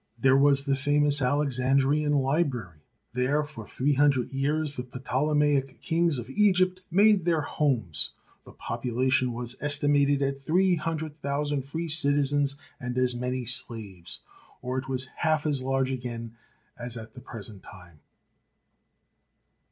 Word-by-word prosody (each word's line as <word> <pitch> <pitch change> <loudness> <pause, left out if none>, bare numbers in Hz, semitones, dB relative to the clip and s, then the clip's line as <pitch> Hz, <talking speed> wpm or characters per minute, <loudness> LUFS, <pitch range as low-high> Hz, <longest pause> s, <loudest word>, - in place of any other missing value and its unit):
There 130 +2 +4
was 140 0 +4
the 140 -1 +2
famous 145 +1 +4
Alexandrian 140 +2 +1
library. 135 - 0 0.3
There 130 +4 +1
for 130 -8 -10
three 145 +3 0
hundred 140 -2 +2
years 145 +2 -1
the 125 - -3 0.2
Ptolemaic 140 0 0
kings 165 -3 +1
of 120 - -5
Egypt 185 +3 +2
made 200 +1 +4
their 165 -2 +1
homes. 125 - -1 0.3
The - - -14
population 125 +2 -1
was 120 +1 -3
estimated 145 -1 +2
at 135 0 -2
three 180 +6 +2
hundred 160 -1 -3
thou 140 +1 -1
sand 145 -3 -2
free 165 +4 -4
citizens 145 -2 +1 0.2
and 125 -2 -4
as 125 -1 +2
many 125 +1 -3
slaves, 110 -7 -5 0.4
or 130 +1 -2
it 130 - -9
was 130 0 -2
half 155 -2 +1
as 145 -3 0
large 135 0 0
again 120 -3 -5 0.4
as 120 0 -4
at 110 -1 -9
the 125 - -11
present 110 -5 -10
time. 85 -5 -15
135 Hz, 140 wpm, -27 LUFS, 125-150 Hz, 0.4 s, There